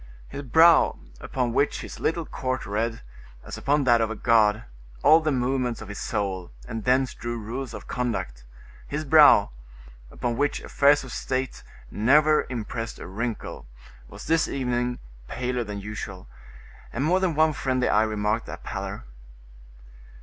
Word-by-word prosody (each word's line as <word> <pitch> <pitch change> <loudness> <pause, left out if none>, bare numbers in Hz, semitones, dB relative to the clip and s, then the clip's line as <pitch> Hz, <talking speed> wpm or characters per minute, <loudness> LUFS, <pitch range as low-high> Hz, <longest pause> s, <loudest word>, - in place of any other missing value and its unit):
His 140 - -6
brow, 160 +6 +5 0.2
upon 125 -3 -2
which 145 - +1
his - - -9
little 165 0 -1
court 130 -2 -3
read, 115 +3 -2 0.4
as - - -6
upon 145 +1 +1
that 120 -3 +4
of 110 - +1
a 110 - -4
god, 110 0 +3 0.4
all 160 - +7
the 155 -1 -1
movements 125 -2 -1
of 110 - -9
his 100 - -6
soul, 95 -5 -3 0.2
and 115 -1 -5
thence 130 0 +2
drew 120 0 -5
rules 120 +4 -6
of - - -9
conduct,—his 105 - -5
brow, 145 -8 +6 0.6
upon 120 - -3
which 145 0 0
affairs 145 0 +3
of 130 - -9
state 130 0 -3 0.3
never 150 +7 +3
impressed 115 -1 -5
a - - -9
wrinkle, 105 - -5 0.4
was - - -11
this 165 0 +2
evening 125 -2 -1 0.3
paler 125 - -2
than 105 -2 -6
usual, 100 -2 -7 0.6
and 125 - -2
more 180 +4 +3
than 185 -4 0
one 155 0 +3
friendly 130 -2 0
eye 105 - +3
remarked 110 +1 -1
that - - -8
pallor. - - -5
125 Hz, 150 wpm, -25 LUFS, 110-140 Hz, 0.6 s, all